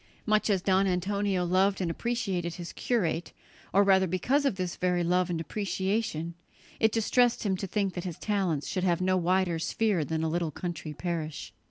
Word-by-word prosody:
Much 215 0 +2
as 190 -3 +2
Don 195 0 +3
Antonio 190 0 0
loved 190 +2 +2
and 175 -3 -1
appreciated 190 -6 -2
his 175 -1 -7
curate, 175 -8 -1 0.4
or 200 +2 +5
rather 190 -1 +4
because 255 - +1
of 275 - +2
this 185 -2 -3
very 180 -1 +1
love 180 +1 +2
and 170 -2 -1
appreciation, 190 -2 -2 0.5
it 220 -1 +4
distressed 235 +2 +2
him 195 -3 +1
to 195 - -4
think 195 0 -1
that 175 - -4
his 175 -3 -5
talents 190 -8 -1
should 185 - -2
have 175 -3 +2
no 185 0 +2
wider 180 -1 +1
sphere 200 0 +1
than 160 +2 -2
a - - +1
little 170 0 -1
country 170 0 -5
parish. 160 -2 -4
185 Hz, 185 wpm, -29 LUFS, 170-200 Hz, 0.5 s, or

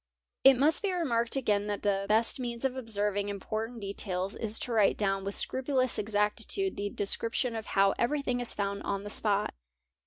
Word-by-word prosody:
| - - -60
It 270 -1 +8
must 295 +5 +4
be 400 -2 0
remarked 240 -10 0
again 210 -6 +1
that 205 -1 -3
the 200 -1 0
best 225 +4 +3
means 240 0 -3
of 260 -1 0
observing 205 -4 -1
import 215 +3 -3
ant 240 -2 -10
details 195 -1 -3
is 220 -1 -2
to 245 - -4
write 215 -3 +3
down 195 -2 0
with 200 +1 -1
scrupulous 260 -1 +1
exactitude 215 - 0
the 205 0 -3
description 230 +4 -1
of 220 -1 -5
how 195 0 +3
everything 250 0 0
is 245 - +1
found 200 0 -3
on 200 0 -3
the 205 - -6
spot. 210 -2 +1
220 Hz, 190 wpm, -30 LUFS, 200-245 Hz, -, It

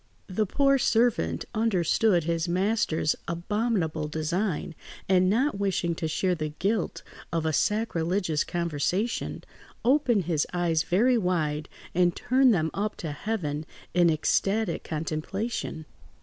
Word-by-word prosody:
The 205 +2 -1
poor 275 +5 +3
servant 225 - +1
understood 200 -3 +2
his 165 +1 -1
master's 180 -4 +1
abominable 170 -3 -1
design, 165 +3 -2 0.3
and 185 -1 +4
not 235 +1 +1
wishing 190 -4 0
to 160 0 -3
share 180 +4 0
the 155 -3 -3
guilt 205 -1 -1 0.3
of 165 -2 -1
a 160 - +1
sacrilegious 180 -5 0
conversation, 175 - -2 0.4
opened 250 -6 +3
his 160 -3 0
eyes 170 -3 +1
very 235 +9 +3
wide 155 -6 -1 0.2
and 175 -1 +3
turned 255 +1 +3
them 160 -6 +1
up 210 +2 -2
to 160 - -5
heaven 155 -3 -3 0.3
in 175 -1 +5
ecstatic 195 +5 +1
contemplation. 160 +3 -3
180 Hz, 120 wpm, -27 LUFS, 160-215 Hz, 0.4 s, in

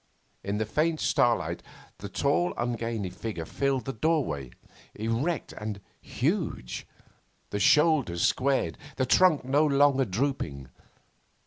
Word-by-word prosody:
In 100 +1 -2
the 110 - 0
faint 155 +8 0
starlight 120 -1 +1 0.4
the - - -7
tall 85 +1 +1
ungainly 115 -5 -2
figure 105 -8 -5
filled 135 +6 -1
the 135 - -3
doorway, 110 - 0 0.5
erect 115 +10 -2
and 105 -1 -5 0.2
huge, 155 - -2 0.6
the 100 - -2
shoulders 140 - +3
squared, 135 +1 +1 0.2
the 130 - +2
trunk 165 +1 +4
no 140 +4 +3
longer 140 -2 +4
drooping. 95 - -2
125 Hz, 115 wpm, -28 LUFS, 100-145 Hz, 0.6 s, trunk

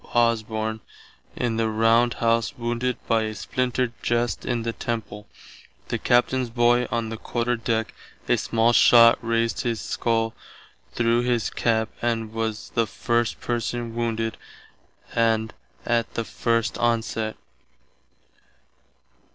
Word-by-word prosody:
Osborne 110 -2 +1 0.6
in 115 -2 -1
the 115 -1 +1
round 115 +2 +3
house 115 -1 +1
wounded 120 +1 -1
by 115 -1 +2
a 110 0 -3
splinter 125 +1 -1
just 120 0 -1
in 120 -2 -1
the 115 0 -2
temple, 110 -3 -5 0.6
the - - -1
Captain's 125 +1 +2
boy 120 +1 +3
on 115 0 -2
the 115 - -5
Quarter 120 +2 -1
Deck 115 -1 -2 0.3
a - - +4
small 115 +1 +2
shott 115 -1 +7
raised 115 0 0
his 115 -2 -1
scull 115 -1 -1 0.6
through 120 0 +2
his 120 -2 0
cap 110 -1 +1
and 115 -2 -1
was 110 -1 -3
the 115 -1 +1
first 120 +1 -1
person 120 0 -2
wounded 115 -1 -2 0.8
and 110 -1 +1 0.3
att 120 -1 0
the 115 - -1
first 115 -3 -1
onsett. 115 -2 0
115 Hz, 125 wpm, -24 LUFS, 115-120 Hz, 0.8 s, shott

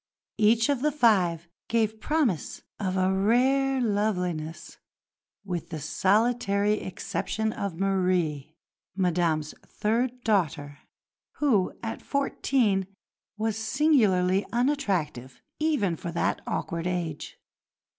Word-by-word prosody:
Each 225 +2 +4
of 280 -3 0
the 300 +2 +2
five 185 - +2 0.2
gave 220 -1 0
promise 280 - -1 0.2
of 190 -2 -1
a 185 +1 +2
rare 260 +7 +2
loveliness 180 -8 -2 0.7
with 175 -4 -4
the 160 -2 -5
solitary 205 - +1
exception 215 +3 -3
of 190 -4 -4
Marie, 180 -6 0 0.4
Madame's 170 -5 0
third 240 +3 -1
daughter, 145 -9 0 0.5
who 225 -11 +1
at 225 - -4
fourteen 250 -8 0 0.5
was 220 0 -1
singularly 215 -8 +3
unattractive 190 - -1 0.2
even 290 - +1
for 170 +1 -6
that 170 - -1
awkward 170 +1 -2
age. 170 -4 -4
200 Hz, 100 wpm, -27 LUFS, 175-235 Hz, 0.7 s, Each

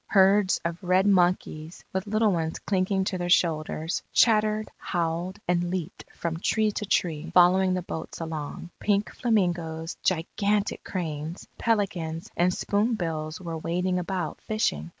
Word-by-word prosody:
Herds 195 0 +4
of 170 +2 -3
red 185 +1 +3
monkeys 175 -4 +1
with 190 +2 -2
little 215 0 +3
ones 165 -2 -1
clinging 190 0 0
to 185 -1 -2
their 175 0 -2
shoulders, 160 -1 +1
chattered, 215 -1 +3
howled, 175 +2 -2
and 175 0 +1
leaped 180 -3 -4
from 165 -1 -3
tree 215 +3 +2
to 210 0 -4
tree, 165 -4 0
following 185 +1 +5
the 180 - -2
boats 160 -2 -6
along. 160 +1 -5
Pink 205 0 +1
flamingoes, 175 -8 0
gigantic 200 +4 0
cranes, 160 -2 -4
pelicans, 175 -7 -1
and 175 +1 +3
spoonbills 175 -8 -1
were 165 -3 -5
wading 180 +3 0
about 180 -3 -3
fishing. 80 - -1
180 Hz, 135 wpm, -26 LUFS, 165-200 Hz, -, following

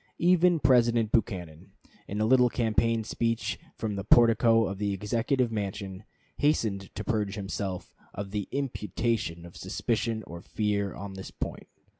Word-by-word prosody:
Even 175 -1 +4
President 120 -5 +3
Buchanan, 90 -9 -2 0.3
in 100 - -4
a 110 - +2
little 125 +1 +5
campaign 115 -1 +1
speech 115 +1 -1 0.2
from 105 -2 -3
the 100 - -3
portico 115 +1 +5
of 100 -1 -4
the 100 -1 0
Executive 115 +5 0
mansion, 100 -1 -4 0.3
hastened 110 -10 +1
to - - -4
purge 105 -4 -1
himself 95 -2 -4 0.2
of 100 0 -6
the 105 -1 -3
imputation 110 -8 -2
of 85 - -13
suspicion 115 -1 -2
or 85 +1 -9
fear 100 -1 -1
on 100 0 -7
this 95 0 -8
point. - - -6
110 Hz, 145 wpm, -28 LUFS, 100-115 Hz, 0.3 s, little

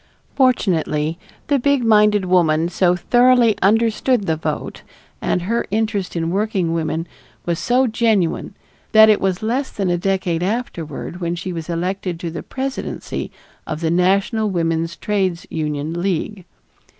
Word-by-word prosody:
Fortunately, 170 - +1 0.3
the 285 -1 +1
big 280 0 +2
minded 210 -3 +4
woman 170 -3 +2
so 180 0 +2
thoroughly 245 +2 +4
understood 225 +2 +2
the 160 - +1
vote 155 -1 -4 0.4
and 180 - 0
her 230 +6 -1
interest 210 -3 -1
in 165 0 -1
working 190 -4 0
women 165 0 -2 0.4
was 170 -1 -1
so 255 +2 +2
genuine 220 -7 0 0.4
that 220 0 +8
it 210 - +4
was 190 +1 -1
less 255 +5 -1
than 195 -3 -2
a 175 - 0
decade 185 -3 -1
afterward 180 -4 -4
when 170 0 -1
she 185 +1 -5
was 165 0 -6
elected 180 +1 -2
to 170 -1 -4
the 160 - -5
presidency 265 0 -5 0.4
of 155 - -4
the 165 -1 0
National 195 +5 +2
Woman's 165 -2 -1
Trades 190 -4 -1
Union 150 0 -3
League. 190 +1 -2
185 Hz, 145 wpm, -20 LUFS, 170-220 Hz, 0.4 s, that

